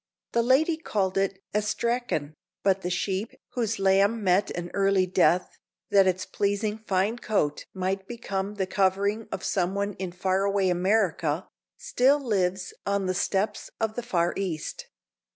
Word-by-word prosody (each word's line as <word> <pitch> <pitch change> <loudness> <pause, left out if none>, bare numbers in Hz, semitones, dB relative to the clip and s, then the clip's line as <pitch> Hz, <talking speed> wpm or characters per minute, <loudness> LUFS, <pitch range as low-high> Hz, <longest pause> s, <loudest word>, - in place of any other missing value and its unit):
The 235 - +2
lady 280 +7 +3
called 195 - -1
it 195 0 -1
astrakhan, 210 -6 -1 0.3
but 195 -1 +2
the 180 - -2
sheep, 190 +4 -2
whose 225 -3 -1
lamb 195 +3 +3
met 190 +1 +3
an 175 0 -5
early 195 -1 +3
death 180 -1 +2 0.3
that 195 -2 +6
its 185 0 0
pleasing 210 +1 -1
fine 210 +2 0
coat 175 -11 0
might 190 +1 -2
become 200 -4 -4
the 195 -2 -1
covering 200 +3 +1
of - - -4
someone 200 +2 0
in 185 -2 -3
far 185 +2 0
away 200 -2 +2
America, 180 -3 +1 0.3
still 290 - +3
lives 190 -7 -1
on 200 -1 0
the 185 - 0
steppes 195 +3 -1
of 220 -1 0
the 245 - -3
Far 175 -8 0
East. 175 -6 -4
195 Hz, 150 wpm, -27 LUFS, 185-215 Hz, 0.3 s, that